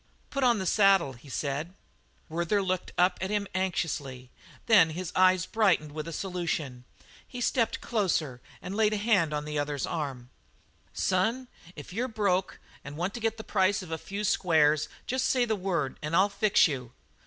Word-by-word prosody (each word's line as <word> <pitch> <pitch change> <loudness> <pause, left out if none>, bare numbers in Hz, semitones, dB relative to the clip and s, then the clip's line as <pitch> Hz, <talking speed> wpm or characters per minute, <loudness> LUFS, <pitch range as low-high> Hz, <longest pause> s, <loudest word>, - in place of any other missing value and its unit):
"Put 275 -1 -1
on 240 -3 +4
the 190 - -3
saddle," 195 -6 +4
he 130 +3 -15
said. 145 +6 -3 0.5
Werther 170 +5 0
looked 185 -1 -2
at 180 0 +2
him 200 +1 -1
anxiously; 145 -9 -3 0.3
then 200 -8 +6
his 185 -2 -4
eyes 185 0 +4
brightened 185 -9 +1
with 155 +1 -6
a - - -5
solution. 165 -8 -3 0.4
He 245 - -8
stepped 240 -1 0
closer 165 - -1 0.2
and 185 +2 -5
laid 215 0 +3
a - - 0
hand 200 -7 +2
on 150 0 -3
the 150 -1 -2
other's 145 -1 -2
arm. 135 -6 -5 0.6
"Son, 225 +8 0 0.3
if 150 +3 -10
you're 240 +5 -1
broke 200 -5 -1 0.2
and 140 +2 -8
want 180 +4 -2
to 240 - -5
get 225 -1 -1
the 220 - -7
price 190 -1 +1
of 170 - -10
a 160 - -1
few 200 +2 -5
squares 155 -6 +3 0.2
just 260 +1 -1
say 250 -2 +2
the 220 -2 0
word 180 -8 -2
and 150 +2 -2
I'll 195 +3 +4
fix 200 -1 +4
you. 125 -5 -5
185 Hz, 175 wpm, -28 LUFS, 150-205 Hz, 0.6 s, then